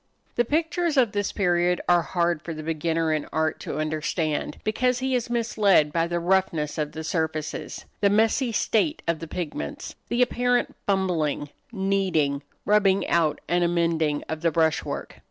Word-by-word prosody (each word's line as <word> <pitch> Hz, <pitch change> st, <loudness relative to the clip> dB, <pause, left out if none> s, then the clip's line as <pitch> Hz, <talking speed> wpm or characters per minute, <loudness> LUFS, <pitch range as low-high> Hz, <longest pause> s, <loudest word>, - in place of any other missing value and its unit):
The 240 Hz, -, +1 dB
pictures 320 Hz, +3 st, 0 dB
of 240 Hz, -5 st, +4 dB
this 205 Hz, -1 st, -1 dB
period 175 Hz, -2 st, +1 dB
are 175 Hz, -1 st, +5 dB
hard 170 Hz, -1 st, 0 dB
for 165 Hz, -1 st, -6 dB
the 155 Hz, -, -7 dB
beginner 160 Hz, 0 st, 0 dB
in 155 Hz, -2 st, -2 dB
art 160 Hz, 0 st, 0 dB
to -, -, -5 dB
understand, 155 Hz, 0 st, -2 dB
because 250 Hz, +3 st, +1 dB
he 260 Hz, +1 st, -1 dB
is 245 Hz, -2 st, 0 dB
misled 205 Hz, -10 st, +3 dB
by 165 Hz, 0 st, +1 dB
the 175 Hz, 0 st, -1 dB
roughness 170 Hz, -4 st, 0 dB
of 150 Hz, -1 st, -2 dB
the 160 Hz, -, -5 dB
surfaces, 160 Hz, -2 st, -3 dB
the 200 Hz, -, +4 dB
messy 225 Hz, +4 st, +2 dB
state 230 Hz, +7 st, +1 dB
of 165 Hz, -1 st, 0 dB
the 165 Hz, -, -7 dB
pigments, 150 Hz, -, -5 dB, 0.2 s
the 240 Hz, +1 st, +3 dB
apparent 245 Hz, 0 st, 0 dB
fumbling, 175 Hz, -7 st, 0 dB, 0.2 s
kneading, 190 Hz, -9 st, 0 dB, 0.2 s
rubbing 200 Hz, -2 st, +3 dB
out 160 Hz, -3 st, +2 dB
and 175 Hz, 0 st, +2 dB
amending, 165 Hz, -3 st, +1 dB
of 160 Hz, 0 st, -4 dB
the 170 Hz, -, +3 dB
brush 160 Hz, 0 st, +2 dB
work. -, -, -6 dB
175 Hz, 165 wpm, -25 LUFS, 160-210 Hz, 0.2 s, are